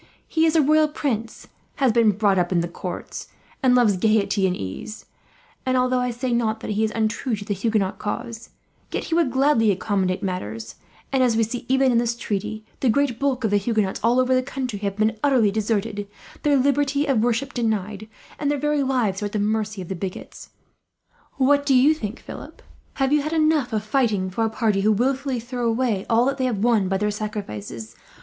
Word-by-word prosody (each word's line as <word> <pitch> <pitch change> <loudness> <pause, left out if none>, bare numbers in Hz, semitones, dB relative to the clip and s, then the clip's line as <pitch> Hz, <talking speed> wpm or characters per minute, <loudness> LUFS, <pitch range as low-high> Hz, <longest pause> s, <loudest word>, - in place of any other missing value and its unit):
He 320 0 +2
is 320 - +1
a 315 - +5
royal 310 +2 +4
prince, 230 -7 -3 0.3
has 270 -4 +2
been 225 -2 +4
brought 200 -1 +2
up 175 0 0
in 170 -1 +1
courts, 180 +1 -6 0.3
and 255 -2 +4
loves 225 -6 +4
gaiety 200 -1 +2
and 180 - -1
ease; 95 - -7 0.6
and 255 0 +1
although 255 0 +2
I 250 0 0
say 245 +1 -3
not 220 -2 0
that - - -4
he 210 +1 0
is 220 - 0
untrue 225 +2 0
to 205 -1 -8
the 205 - -1
Huguenot 200 -1 -1
cause, 230 +2 -5 0.4
yet - - -2
he - - -4
would 330 -4 +3
gladly 260 -4 +3
accommodate 190 -1 0
matters; 115 - -4 0.4
and 265 -1 +2
as 240 -3 +3
we 225 - +3
see, 230 +2 -5
even 265 0 +3
in 235 - +3
this 235 0 0
treaty, 215 -1 -4
the 260 - +2
great 260 -1 +1
bulk 270 -3 0
of 220 - +1
the 205 - +4
Huguenots 210 -2 -1
all 240 +3 +3
over 255 0 +2
the 255 - +3
country 255 -5 -4
have 200 -1 -3
been 215 +1 +1
utterly 255 -8 +3
deserted, 210 -1 -2 0.3
their 290 -1 +3
liberty 280 +1 +1
of 270 -7 +2
worship 245 +3 0
denied, 215 -3 -2 0.3
and 290 - 0
their 290 - +1
very 295 +1 0
lives 245 -8 0
are - - -1
at 205 - -12
the - - 0
mercy 215 -1 -1
of - - -11
the 190 - -3
bigots. 185 +1 -7 0.8
"What 285 +1 +3
do 280 -2 +3
you 270 +5 +6
think, 225 -7 -6
Philip? - - -10 0.3
Have 270 +1 +1
you 300 - +4
had 305 +3 -3
enough 310 -5 +2
of 215 -1 -1
fighting 215 -5 0
for 225 +5 -1
a 225 - +1
party 220 -3 0
who 215 +2 +3
wilfully 265 +3 0
throw 240 +1 -3
away 225 -4 0
all 230 +1 +4
that 275 +1 -1
they 260 - +1
have 220 -5 -1
won 225 -5 +3
by 190 +1 0
their 210 +1 0
sacrifices? 115 - -6
225 Hz, 210 wpm, -23 LUFS, 205-260 Hz, 0.8 s, you